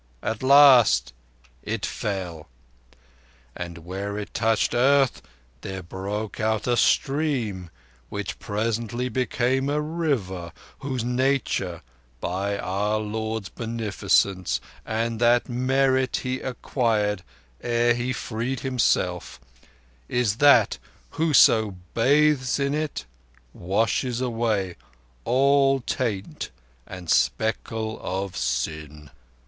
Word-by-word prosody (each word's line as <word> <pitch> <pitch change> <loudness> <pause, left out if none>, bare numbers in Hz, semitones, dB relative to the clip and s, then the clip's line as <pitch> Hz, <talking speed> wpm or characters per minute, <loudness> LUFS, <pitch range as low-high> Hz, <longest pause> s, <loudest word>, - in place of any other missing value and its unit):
At 110 0 -2
the 130 - -3
last 135 - +6 0.5
it - - -3
fell; 90 -7 -4 1.1
and, 85 -1 -6
where 100 +3 -4
it 105 - -6
touched 110 -1 +1
earth, 135 +2 +3 0.4
there 95 -1 -6
broke 100 +4 -5
out 110 0 0
a 125 - +2
stream 120 - +1 0.4
which - - -5
presently 115 +3 -2
became 130 +2 0
a 150 +1 +1
River, 135 - -2 0.3
whose 130 -4 -3
nature, 125 -8 0 0.4
by 100 +6 -2
our 100 +3 -1
Lord's 110 -1 -3
beneficence, 100 -4 0 0.3
and 115 0 -1
that 120 0 +3
merit 130 +1 +1
He 130 0 -2
acquired 110 -6 -1 0.4
ere 120 0 +2
He 120 +2 -2
freed 120 +1 -3
himself, 95 - 0 0.7
is 120 -4 +1
that 125 -7 +5 0.3
whoso 115 - +4 0.2
bathes 140 +1 +3
in 140 0 0
it 150 - -3 0.5
washes 115 +6 0
away 115 -7 -1 0.5
all 135 +1 +3
taint 110 -6 -3 0.4
and 90 -2 -9
speckle 110 +4 0
of 95 0 -3
sin." 75 +3 -3
115 Hz, 100 wpm, -24 LUFS, 100-130 Hz, 1.1 s, last